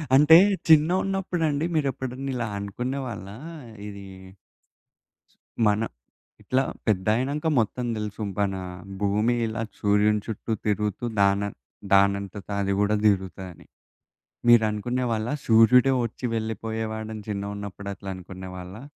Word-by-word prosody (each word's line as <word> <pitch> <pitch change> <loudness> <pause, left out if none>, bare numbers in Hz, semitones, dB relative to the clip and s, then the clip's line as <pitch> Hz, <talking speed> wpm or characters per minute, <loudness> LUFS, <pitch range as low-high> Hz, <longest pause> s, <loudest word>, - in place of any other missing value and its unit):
అంటే 150 +4 +8 0.3
చిన్న 155 0 +6
ఉన్నప్పుడండి 175 -6 -1
మీరెప్పుడన్నా 135 -2 -2
ఇలా 120 -2 -2
అనుకున్నే 125 +7 -3
వాళ్ళా 100 -3 -7 0.5
ఇది 100 -1 -9 1.6
మన 105 +1 +3 0.6
ఇట్లా 130 +1 +1 0.2
పెద్దయినంక 115 - +1
మొత్తం 120 +2 0
దెలుసు 105 0 -4
బన 100 -1 0 0.5
భూమి 105 +4 +2
ఇలా 115 +1 -3 0.2
సూర్యుని 105 0 +3
చుట్టూ 110 0 -4
తిరుగుతూ 105 +2 -1 0.2
దాన 100 0 +4 0.5
దానంతట 100 0 +2
అది 100 0 0
గూడా 105 +1 +2
దిరుగుతదని. 95 -3 -1 0.8
మీరనుకునే 120 +2 +3
వాళ్ళ 110 0 -1 0.2
సూర్యుడే 120 +4 +6
ఒచ్చి 115 +2 -6
వెళ్ళిపోయేవాడని 110 0 -4
చిన్నగున్నప్పుడు 100 -1 -5
అట్లా 100 0 -9
అనుకున్నే 95 0 -9
వాళ్ళా? 90 +5 -9
110 Hz, 105 wpm, -25 LUFS, 100-125 Hz, 1.6 s, అంటే